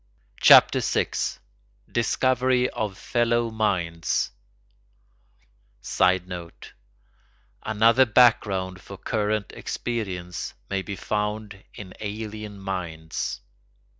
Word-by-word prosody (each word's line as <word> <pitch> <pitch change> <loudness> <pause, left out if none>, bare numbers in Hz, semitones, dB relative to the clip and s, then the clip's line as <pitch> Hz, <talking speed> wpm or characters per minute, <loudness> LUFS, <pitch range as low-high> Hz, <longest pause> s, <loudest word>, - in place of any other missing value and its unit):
CHAPTER - - +8
VI—DISCOVERY 125 - -1
OF 105 -3 -3
FELLOW 120 0 0
MINDS 90 -7 0 1.5
[Sidenote: 90 0 -1 0.9
Another 115 +4 +4
background 100 -6 +3
for 100 - -10
current 105 +1 -1
experience 95 -7 -4 0.2
may 100 -1 0
be 100 +2 -6
found 105 -1 -3
in 95 -3 -9
alien 105 0 -6
minds. 85 -8 -4
105 Hz, 75 wpm, -25 LUFS, 90-110 Hz, 1.5 s, CHAPTER